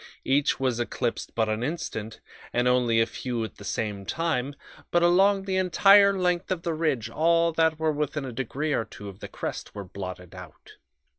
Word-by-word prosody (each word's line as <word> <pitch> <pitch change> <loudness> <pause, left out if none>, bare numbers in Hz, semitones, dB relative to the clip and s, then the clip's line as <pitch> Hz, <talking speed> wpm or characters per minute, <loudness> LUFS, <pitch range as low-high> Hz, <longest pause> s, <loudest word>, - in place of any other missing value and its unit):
Each 140 +2 +2
was 130 -3 0
eclipsed 120 0 -3
but 110 -1 +1
an 110 +1 -1
instant, 115 -6 -4 0.3
and 120 +1 +2
only 125 -2 +3
a 115 - +4
few 120 0 -4
at 110 - -7
the - - -11
same 100 -1 -3
time, 145 0 -2 0.3
but 175 0 +2
along 195 +3 +4
the 190 -1 -1
entire 195 +2 +5
length 180 -1 0
of 180 -3 -2
the 170 - -1
ridge 155 -8 0
all 165 +1 +2
that 160 -1 +2
were 160 0 +1
within 150 -1 -2
a 130 - -5
degree 135 +5 -2
or 115 - +1
two 100 0 -10
of 95 0 -12
the - - -7
crest - - -6
were 100 - -5
blotted 90 -1 -8
out. 90 -3 -13
135 Hz, 195 wpm, -26 LUFS, 115-170 Hz, 0.3 s, entire